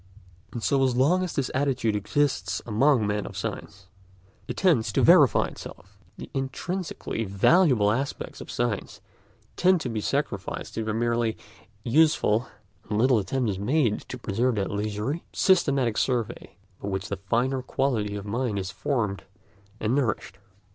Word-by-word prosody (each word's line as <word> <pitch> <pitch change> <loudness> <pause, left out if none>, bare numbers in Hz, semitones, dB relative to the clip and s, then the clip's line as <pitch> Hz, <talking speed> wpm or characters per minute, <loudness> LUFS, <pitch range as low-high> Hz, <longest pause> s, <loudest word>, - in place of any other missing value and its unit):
And 120 - -6
so 140 - +2
long 135 +7 +3
as 180 - -4
this 135 -3 -1
attitude 130 -5 0
exists 140 +7 0
among 120 +1 +3
men 105 0 -1
of - - -9
science, 100 -1 -6 0.6
it - - -5
tends 160 - +3
to - - +2
verify - - +6
itself: - - -11 0.2
the - - -8
intrinsically 135 0 -3
valuable 105 - +4
aspects 135 +5 -3
of - - -10
science 120 -4 -2 0.6
tend 185 0 +4
to 125 - -3
be 110 -2 -3
sacrificed - - -3
to 110 - -2
the 110 - -2
merely 115 -1 0 0.5
useful, 125 -4 +3 0.4
and 105 - 0
little 125 +1 +4
attempt 120 +3 -1
is 95 - -5
made 120 0 +1
to 125 - -5
preserve 120 +2 0
that 100 -2 -1
leisurely, 105 +9 -2
systematic 140 - +2
survey 120 -3 -2 0.3
by - - -5
which 95 -1 -3
the 100 - -3
finer 130 +4 +1
quality 120 -6 -1
of 100 -1 -6
mind 115 0 -2
is 95 0 -3
formed 105 -8 -2 0.5
and 110 +2 0
nourished. 115 -7 -1
120 Hz, 150 wpm, -26 LUFS, 105-135 Hz, 0.6 s, verify